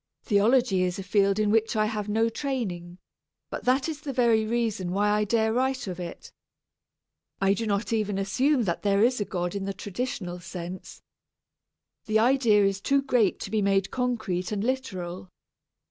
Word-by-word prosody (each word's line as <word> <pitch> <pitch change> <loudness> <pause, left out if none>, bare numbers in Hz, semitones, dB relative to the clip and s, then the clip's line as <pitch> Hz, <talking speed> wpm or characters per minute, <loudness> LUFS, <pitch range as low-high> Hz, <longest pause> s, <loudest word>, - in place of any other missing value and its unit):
Theology 215 -1 +3
is 180 +1 0
a 195 - -5
field 200 +1 +2
in 210 -1 +2
which 225 +1 +2
I 215 0 +2
have 215 -1 -3
had 210 - -2
no 225 +1 +3
training, 220 -9 -4 0.5
but - - -6
that 260 +3 +2
is 305 -2 -5
the 295 -3 -4
very 235 -4 +2
reason 220 -6 -1
why 205 +2 +2
I 210 0 +2
dare 220 +1 +1
write 260 +1 0
of 185 -2 -6
it. 175 -1 -8 1.1
I 195 0 +3
do 225 +2 -3
not 205 +3 -1
even 210 -3 0
assume 250 +8 +1
that 170 -5 -2
there 200 0 +2
is 250 -1 +2
a - - 0
God 175 -1 -3
in 200 -1 -3
the 195 0 -4
traditional 190 -3 -4
sense. 175 +1 -8 1.0
The 215 0 +2
idea 225 -3 +4
is 195 0 0
too 275 +4 +2
great 245 -8 +2
to 195 - -6
be 215 -1 +1
made 195 -1 +1
concrete 220 -8 -2
and 205 -1 -2
literal. 190 -9 -3
210 Hz, 180 wpm, -26 LUFS, 195-240 Hz, 1.1 s, idea